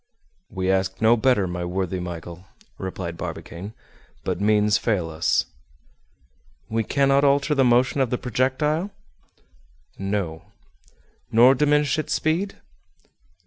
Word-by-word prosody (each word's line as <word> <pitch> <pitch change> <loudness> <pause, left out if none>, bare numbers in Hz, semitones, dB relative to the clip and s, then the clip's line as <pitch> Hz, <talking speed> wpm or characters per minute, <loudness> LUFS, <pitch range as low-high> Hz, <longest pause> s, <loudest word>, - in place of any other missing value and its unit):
"We 95 -2 -1
ask 95 0 0
no 110 +2 +5
better, 120 -4 +2
my 90 -1 -4
worthy 95 +1 -2
Michel," 85 +1 -7 0.3
replied 90 -3 -5
Barbicane, 95 +6 -7 0.5
"but 90 0 -2
means 105 0 +3
fail 90 -8 -1
us." 80 +1 +1 1.2
"We 115 0 0
cannot 140 +3 +2
alter 140 +1 +3
the 135 -2 +3
motion 125 +2 +3
of 130 - +1
the 125 - -1
projectile?" 150 +9 0 1.1
"No." 95 -5 -3 0.9
"Nor 120 +4 +7
diminish 150 +2 +2
its 155 - -1
speed?" 170 +6 -1
110 Hz, 115 wpm, -23 LUFS, 95-135 Hz, 1.2 s, Nor